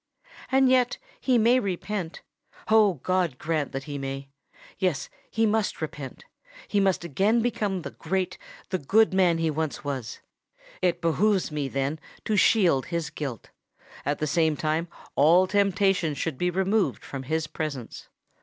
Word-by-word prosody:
And 265 0 +5
yet 255 -1 +3 0.2
he 255 -2 +2
may 235 +3 +5
repent—oh! 200 +1 -1
God 180 -7 +1
grant 155 -1 -1
that 135 0 -4
he 145 0 -5
may! 135 0 -5 0.5
Yes—he 190 +5 -1
must 220 -1 0
repent: 145 - -6 0.4
he 205 - +1
must 190 -3 +2
again 200 - +2
become 205 -6 -1
the - - -6
great, 185 -1 -2 0.3
the 185 - 0
good 210 +8 +3
man 180 -3 +4
he 165 -1 +1
once 155 0 -3
was! 130 -5 -4 0.6
It 180 -2 +1
behoves 185 +3 +2
me, 150 -2 -2
then, 135 +3 -2 0.3
to 215 - +1
shield 180 - +4
his 170 -2 -3
guilt:—at 140 +1 -7
the 155 - -1
same 160 0 +2
time 155 +2 0 0.3
all 165 +6 +6
temptation 195 -4 +2
should 145 -1 -3
be 180 - +2
removed 190 +3 0
from 135 - -6
his 155 +4 -1
presence. 150 -6 -6
170 Hz, 145 wpm, -26 LUFS, 150-200 Hz, 0.6 s, all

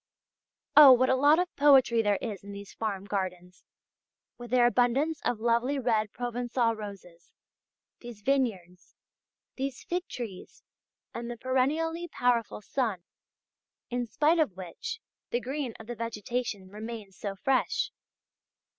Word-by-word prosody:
Oh! 290 -2 +11
what 255 +1 +3
a - - +4
lot 290 +4 +5
of 360 +1 -1
poetry 270 -5 +5
there 205 -2 +2
is 210 -5 -5
in 200 0 -9
these 200 0 -9
farm 200 -3 -3
gardens, 185 -3 -4 0.7
with 240 -1 -10
their 245 -1 +4
abundance 255 +6 +2
of 235 - -1
lovely 235 +4 +1
red 225 -5 +1
Provençal 240 -1 -1
roses, 195 -5 -10 0.7
these 235 -4 -11
vineyards, 200 -10 -1 0.6
these 270 -1 -4
fig 355 +1 -3
trees, 220 -7 -8 0.5
and 235 0 -5
the 240 - -5
perennially 310 +8 0
powerful 240 -7 0
sun, 215 -6 -2 0.9
in 245 0 -1
spite 305 +9 +2
of 225 - +1
which 455 - -6 0.3
the 240 - 0
green 265 -1 -4
of 225 - -10
the 240 - -5
vegetation 230 -2 -4
remains 215 -1 -8
so 200 0 -5
fresh! 425 - 0
240 Hz, 135 wpm, -29 LUFS, 210-265 Hz, 0.9 s, Oh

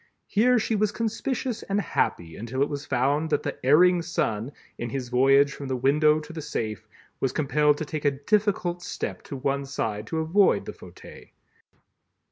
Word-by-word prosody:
Here 245 +4 +3
she 225 0 0
was 210 0 +1
conspicuous 230 +2 -2
and 200 +1 -1
happy 85 - -1
until 125 +5 -2
it 145 - -1
was 145 0 -5
found 140 +5 +1
that 150 - 0
the - - -5
Erring 175 +6 +5
Son 120 -8 -2 0.3
in 120 - -3
his 125 0 -4
voyage 135 +3 +4
from 140 - -7
the 130 - -1
window 150 +4 +3
to 160 - -11
the 160 - -5
safe, 110 -8 -4 0.3
was 135 - 0
compelled 150 +1 +2
to 155 - -4
take 150 0 -5
a - - +6
difficult 175 +4 0
step - - -5
to 140 - -6
one 140 +1 -1
side 110 -6 -3
to 160 - -3
avoid 165 +6 +3
the - - -6
fauteuil. - - -13
145 Hz, 180 wpm, -26 LUFS, 135-175 Hz, 0.3 s, a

